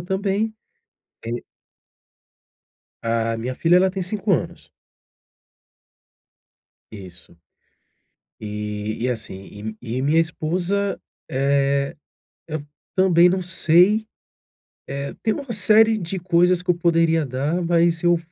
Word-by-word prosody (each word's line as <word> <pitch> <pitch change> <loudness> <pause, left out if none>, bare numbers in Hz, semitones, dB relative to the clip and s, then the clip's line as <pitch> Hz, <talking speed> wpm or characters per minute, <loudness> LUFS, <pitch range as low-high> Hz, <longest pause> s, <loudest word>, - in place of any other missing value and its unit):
também, 195 +4 -1 0.7
eh 115 - -4 1.7
A 115 0 0
minha 120 +3 -4
filha, 170 +6 +3
ela 190 +1 +4
tem 190 0 -4
5 200 +2 0
anos. 140 - -3 2.2
Isso. 90 -4 -12 1.0
E 105 0 -5
e 125 - +1
assim 105 -1 -6
e 120 0 -4
e 130 - -1
minha 150 +4 +3
esposa, 180 +5 -1 0.3
eh, 140 +1 +1 0.5
eu 155 -2 -4 0.3
também 180 -2 +5
não 185 +1 0
sei. 180 +5 +3 0.8
Eh, 140 +1 -5
tem 220 - +1
uma 275 -4 -6
série 220 +2 +5
de 185 +1 -4
coisas 180 0 +2
que 180 - -1
eu - - +4
poderia 165 -2 +2
dar, 140 +7 -2
mas 170 -1 +2
eu, 175 0 +3
165 Hz, 110 wpm, -22 LUFS, 130-185 Hz, 2.2 s, também